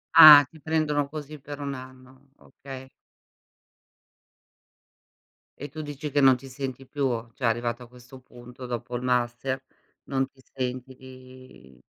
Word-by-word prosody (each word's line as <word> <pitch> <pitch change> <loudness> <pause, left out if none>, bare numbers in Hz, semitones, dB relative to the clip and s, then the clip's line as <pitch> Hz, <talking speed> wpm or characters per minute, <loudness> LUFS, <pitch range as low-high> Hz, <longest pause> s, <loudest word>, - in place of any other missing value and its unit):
Ah, 145 -2 +12
ti 160 - -16
prendono 150 -2 0
così, 150 -1 -8
per 145 +1 -9
1 140 -1 -4
anno, 130 +1 -13
okay. 130 -1 -11 2.7
E 145 +1 -6
tu 155 +2 -7
dici, 145 0 -6
che 145 +1 +2
non 130 -2 +6
ti 135 - -12
senti 135 0 -6
più, 140 -1 -1 0.2
cioè, 130 - -12
arrivato 120 +1 0
a 120 - -10
questo 125 +1 -15
punto, 125 0 -12
dopo 120 0 -5
il 120 - -3
master, 125 +1 -1 0.4
non 135 -1 -1
ti 135 - -29
senti 130 0 -4
di 130 - -15
130 Hz, 140 wpm, -26 LUFS, 125-140 Hz, 2.7 s, Ah